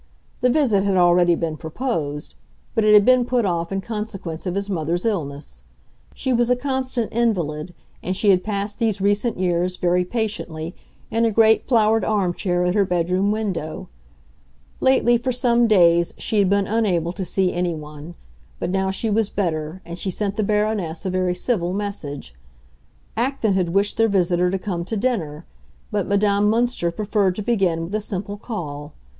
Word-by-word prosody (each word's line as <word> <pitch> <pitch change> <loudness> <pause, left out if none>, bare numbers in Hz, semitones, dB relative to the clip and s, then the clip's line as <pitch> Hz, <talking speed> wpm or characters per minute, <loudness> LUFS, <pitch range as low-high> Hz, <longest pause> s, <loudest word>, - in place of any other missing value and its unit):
The 250 - +3
visit 245 -8 +2
had 195 -2 +1
already 175 -1 +4
been 160 -2 -3
proposed, 160 - -4 0.4
but 225 - +1
it 210 0 +6
had 205 -1 +7
been 255 -1 +5
put 245 -2 0
off 170 -2 -1
in 195 0 -1
consequence 195 -6 -5
of 180 - -2
his 200 0 -2
mother's 175 -1 -2
illness. 145 - -3 0.5
She 260 - -1
was 240 0 +2
a 250 - +4
constant 255 -3 -2
invalid, 175 -8 -1 0.3
and 185 +1 -3
she 200 0 +4
had 185 -1 +2
passed 205 0 -3
these 220 -4 +1
recent 205 +4 +1
years, 180 0 0
very 180 0 +2
patiently, 180 -6 -4 0.4
in 230 +1 +1
a 230 - +4
great 220 0 +4
flowered 225 -2 +3
arm 200 -5 +1
chair 180 -1 -1
at 180 - +1
her 205 0 +3
bedroom 180 +2 0
window. 195 -8 -3 0.9
Lately, 250 -2 +3
for 255 +2 -1
some 240 -1 +2
days, 170 -5 +4
she 215 - -1
had 195 -2 +3
been 200 0 +2
unable 185 -6 0
to 190 - -4
see 185 0 +1
anyone; 160 -2 -4 0.4
but - - -3
now 190 0 0
she 195 +4 -2
was 215 0 +1
better, 165 -2 -3
and 170 +1 -7
she 190 - -2
sent 200 +2 -2
the 215 - 0
Baroness 210 -5 -1
a 190 - -1
very 185 -1 0
civil 180 -3 -1
message. 165 - -5 0.8
Acton 235 -3 0
had 185 -2 +1
wished 200 +4 0
their 225 0 +3
visitor 180 -2 +2
to 190 - -1
come 185 -3 -3
to 215 +5 -3
dinner; 195 -11 -2 0.5
but - - -1
Madame 200 0 +2
Münster 230 -6 +1
preferred 200 -1 0
to 210 - -4
begin 190 -8 +1
with 170 +4 -7
a 215 - 0
simple 205 0 -4
call. 150 -10 -6
195 Hz, 175 wpm, -22 LUFS, 175-220 Hz, 0.9 s, had